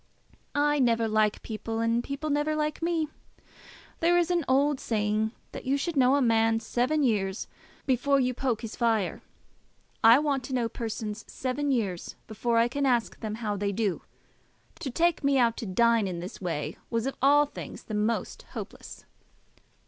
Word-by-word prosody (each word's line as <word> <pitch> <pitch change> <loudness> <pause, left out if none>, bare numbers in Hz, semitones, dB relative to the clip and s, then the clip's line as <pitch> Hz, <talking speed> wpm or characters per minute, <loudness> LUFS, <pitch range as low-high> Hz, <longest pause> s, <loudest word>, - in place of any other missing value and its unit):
"I 295 0 +2
never 230 -3 +3
like 215 -1 +1
people, 225 +1 -4
and 230 +1 +1
people 285 +3 -4
never 295 +2 +1
like 305 +1 -2
me. 330 -2 0 0.9
There 345 +1 +4
is 350 0 +2
an 345 -2 +2
old 275 +1 +3
saying 215 0 0 0.2
that - - -8
you 270 +2 +2
should 335 +4 -2
know 260 0 +5
a 285 - +3
man 225 -1 +3
seven 250 +6 0
years 200 -5 0 0.4
before 275 +1 +2
you 255 -1 +1
poke 250 -3 -1
his 225 - -6
fire. 225 -5 0 0.8
I 230 +2 +9
want 280 -3 0
to 260 - -3
know 240 -2 +1
persons 220 -2 -5
seven 275 +3 -2
years 205 -9 -1
before 230 +2 -1
I 230 +1 +5
can 280 +3 -1
ask 240 -3 +1
them 215 -1 -4
how 205 -1 0
they 200 0 -1
do. 200 -2 -1 0.8
To 270 - -4
take 330 +5 +1
me 280 0 +3
out 235 -2 +3
to 225 - -5
dine 230 +2 +3
in 175 -2 -4
this 180 +4 -8
way 160 -4 -3
was 230 0 -1
of 270 - -2
all 290 +2 +6
things 290 - -9
the 215 - -8
most 215 +2 -1
hopeless." - - -8
235 Hz, 175 wpm, -28 LUFS, 220-280 Hz, 0.9 s, I